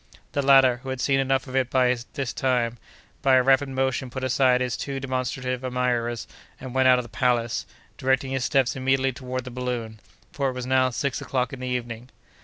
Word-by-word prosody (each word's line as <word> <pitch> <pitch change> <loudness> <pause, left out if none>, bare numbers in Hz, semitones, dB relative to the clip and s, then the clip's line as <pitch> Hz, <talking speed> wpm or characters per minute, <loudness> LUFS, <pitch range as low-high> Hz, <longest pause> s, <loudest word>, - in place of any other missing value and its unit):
The 140 - 0
latter, 135 -2 +6
who 130 +2 -9
had 130 -1 -3
seen 135 +1 +2
enough 135 0 +1
of 130 -1 -8
it 130 -2 +1
by 125 -1 +3 0.2
this 135 -6 -3
time, 120 -3 0 0.4
by 135 -2 +4
a 130 - +5
rapid 135 +1 +3
motion 130 -1 -1
put 130 +2 -6
aside 130 -1 +3
his 125 -2 -1
too 140 -1 -4
demonstrative 130 -1 -3
admirers 125 -2 -1 0.3
and 130 -2 -8
went 130 0 +3
out 125 -1 +6
of 125 - -1
the - - -12
palace, 120 0 0 0.3
directing 130 0 +1
his 135 -2 -1
steps 135 -4 +2
immediately 135 0 +1
toward 130 0 -5
the 125 - -8
balloon, 120 -3 -4 0.3
for 140 -5 -1
it - - -4
was 125 -1 -5
now 130 0 +3
six 135 +3 -2
o'clock 130 0 -2
in 135 - -7
the 130 - -5
evening. 120 -1 -4
130 Hz, 205 wpm, -25 LUFS, 125-135 Hz, 0.4 s, latter